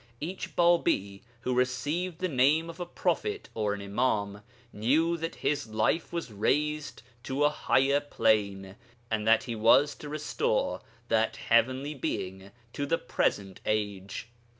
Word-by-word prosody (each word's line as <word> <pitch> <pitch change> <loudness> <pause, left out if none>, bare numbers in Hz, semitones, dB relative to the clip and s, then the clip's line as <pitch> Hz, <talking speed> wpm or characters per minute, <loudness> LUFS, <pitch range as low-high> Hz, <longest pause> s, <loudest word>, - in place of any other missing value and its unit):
Each 180 +5 -5
Bābī 170 - +2 0.2
who 125 - -1
received 145 +8 -1
the 185 - -1
name 155 +3 +2
of 165 - -16
a 175 - -4
prophet 420 - -2
or 105 -2 0
an 100 - -8
Imām 100 -1 -1 0.3
knew 150 +11 +2
that 165 0 -4
his 145 -6 -1
life 110 +10 0
was 170 -8 -4
raised 150 +9 -1 0.2
to 135 +3 -1
a 150 - +4
higher 140 -1 +2
plane, 100 -8 0 0.3
and 110 0 -1
that 115 0 +5
he 120 - -4
was 130 +7 +5
to 150 - -8
restore 470 - -1 0.3
that - - +2
heavenly 135 +3 +1
Being 95 -7 -4 0.2
to 145 - -3
the 165 - +2
present 95 -2 -1
age. 100 -1 -2
130 Hz, 145 wpm, -29 LUFS, 105-160 Hz, 0.3 s, that